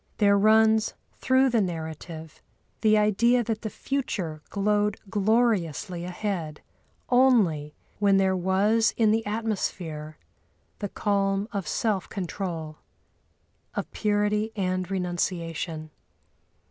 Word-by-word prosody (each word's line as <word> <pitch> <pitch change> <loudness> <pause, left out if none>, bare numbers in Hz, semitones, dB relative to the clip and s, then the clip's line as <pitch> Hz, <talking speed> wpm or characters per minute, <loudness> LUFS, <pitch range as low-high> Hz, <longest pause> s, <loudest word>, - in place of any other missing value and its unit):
There 200 -2 +4
runs 220 +1 +4 0.2
through 260 0 +3
the 230 -2 +3
narrative 160 -2 -6 0.4
the 215 0 +5
idea 235 +4 +3
that 220 -1 -3
the 220 - -3
future 195 - -3
glowed 210 0 +1
gloriously 205 -5 +1
ahead 180 -4 -4 0.5
only 215 - +3 0.2
when 200 -1 +4
there 190 -1 +3
was 200 +5 +2
in 220 -2 +4
the 225 +1 +1
atmosphere 180 -8 -3 0.6
the 205 - -3
calm 195 0 0
of 200 -7 -3
self 200 +3 -1
control, 170 -5 -5 1.0
of - - -4
purity 210 +1 0
and 185 -2 -1
renunciation. 170 -3 -3
200 Hz, 105 wpm, -26 LUFS, 175-220 Hz, 1.0 s, the